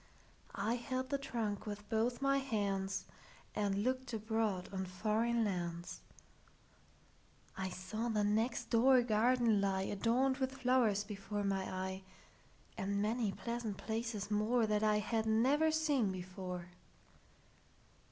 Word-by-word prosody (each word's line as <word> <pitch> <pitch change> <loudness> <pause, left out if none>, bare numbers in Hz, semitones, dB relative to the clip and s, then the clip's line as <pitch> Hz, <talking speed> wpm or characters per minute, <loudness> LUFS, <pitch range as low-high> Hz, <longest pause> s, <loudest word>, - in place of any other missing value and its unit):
I 220 +5 0
held 255 +2 -3
the 280 - +1
trunk 225 -7 -3
with 210 0 -6
both 235 +4 0
my 275 0 +3
handsAnd 200 -6 -1 0.8
looked 255 +1 -1
abroad 220 -4 -1
on 190 -1 -1
foreign 220 +5 +1
lands.I 175 +1 -8
saw 185 +6 -4
the 215 -2 +1
next 220 +4 0
door 250 +2 +6
garden 230 -1 +3
lie, 190 -1 +1
Adorned 240 +7 +1
with 265 0 -1
flowers, 250 -6 +3
before 205 0 -4
my 195 -1 0
eye, 190 0 -3 0.7
And 200 +1 -1
many 215 0 +1
pleasant 235 -1 -4
places 220 -2 -3
moreThat 215 0 +2
I 215 -1 +3
had 220 +1 0
never 265 +8 +4
seen 295 -9 +2
before. 180 -1 -6
220 Hz, 115 wpm, -36 LUFS, 195-240 Hz, 0.8 s, door